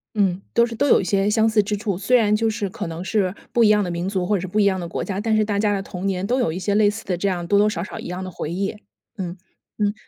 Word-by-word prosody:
嗯， 195 -3 +1
都 235 - +5
是 235 - -6
都 285 - +1
有 - - +6
一 - - -1
些 195 +2 +1
相 220 +1 +3
似 220 -1 +4
之 210 +1 -2
处， 200 -3 -2
虽 225 +7 +3
然 210 -3 +3
就 225 +1 +1
是 210 -2 -2
可 180 - -5
能 165 +1 -5
是 190 0 0 0.2
不 235 - +4
一 - - +6
样 210 -1 +4
的 180 - -3
民 170 +1 -3
族 190 -2 -1
或 205 +3 +1
者 - - 0
是 185 - -4
不 205 +4 -1
一 205 - +4
样 190 -2 +2
的 170 - -4
国 - - -3
家， 195 -1 -3
但 220 +1 +1
是 215 - +3
大 205 -1 -1
家 205 -1 +2
的 195 - -2
童 190 -1 -5
年 190 -1 -1
都 250 +5 +1
有 240 - +1
一 165 - -4
些 190 +2 -1
类 210 0 +4
似 220 +2 -6
的 180 -3 -1
这 200 - -1
样 180 -3 -1
多 200 +3 +3
多 210 +1 +4
少 170 -5 -3
少 205 - -7
一 - - -7
样 180 +2 -4
的 185 - -6
回 160 - -5
忆， 195 +3 -1 0.5
嗯， 180 -1 -5 0.4
嗯。 205 -1 +1
200 Hz, 355 characters per minute, -22 LUFS, 185-215 Hz, 0.5 s, 有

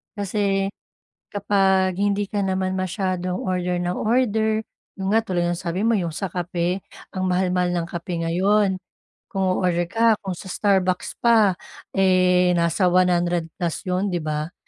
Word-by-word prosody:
Kasi 200 -1 0 0.6
kapag 195 -2 +2
hindi 200 +1 0
ka 205 0 -2
naman 190 -1 -1
masyadong 185 -1 -2
order 180 -1 -1
nang 175 0 -1
order, 220 -1 +1 0.3
'yon 190 - -3
nga, 225 - +4
tulad 180 -5 -1
ng 175 - 0
sabi 180 +5 -2
mo 230 - +3
'yong 175 -5 0
sa 180 +5 -4
kape, 175 +1 -2 0.3
ang 185 - -2
mahal-mahal 180 0 +1
ng 175 -1 -1
kape 170 0 -5
ngayon. 190 +2 +2 0.4
Kung 195 -4 -4 0.2
o-order 175 -2 0
ka, 225 +2 +4
kung 190 -2 -4
sa - - -10
Starbucks 185 -2 0
pa, 220 -6 +4 0.4
eh, 180 -1 +4
nasa 170 +2 +1
100 175 -2 +2
plus 170 -2 -2
'yon 185 +1 0
'di 175 - -1
ba? 155 +1 -3
185 Hz, 150 wpm, -23 LUFS, 175-200 Hz, 0.6 s, nga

